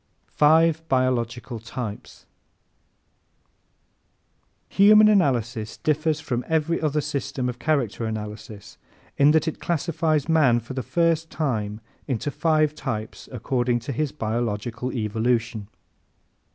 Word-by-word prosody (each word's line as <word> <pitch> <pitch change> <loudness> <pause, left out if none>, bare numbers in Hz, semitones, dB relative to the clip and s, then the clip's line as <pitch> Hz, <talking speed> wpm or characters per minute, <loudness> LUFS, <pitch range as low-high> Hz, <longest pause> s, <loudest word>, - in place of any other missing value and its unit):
Five 160 +2 +4
Biological 120 -2 -1
Types 115 -1 -7 2.5
¶ - - -21
_Human 215 +1 +8
Analysis 120 - 0
differs 155 0 0
from 125 -4 -3
every 160 +1 0
other 150 -1 0
system 135 -3 -3
of 125 -1 -5
character 125 -6 0
analysis 105 -1 -7 0.4
in 140 +1 +6
that 160 +2 +3
it 160 - -3
classifies 160 -2 0
man, 150 -8 +4
for 120 +3 -9
the 130 - -3
first 165 +4 0
time, 110 -8 -2 0.3
into 135 +1 -2
five 155 -1 +2
types 110 -8 -5
according 125 0 0
to 130 - -5
his 145 +2 -1
biological 115 0 -3
evolution. 115 -1 -1
130 Hz, 110 wpm, -24 LUFS, 115-155 Hz, 2.5 s, Human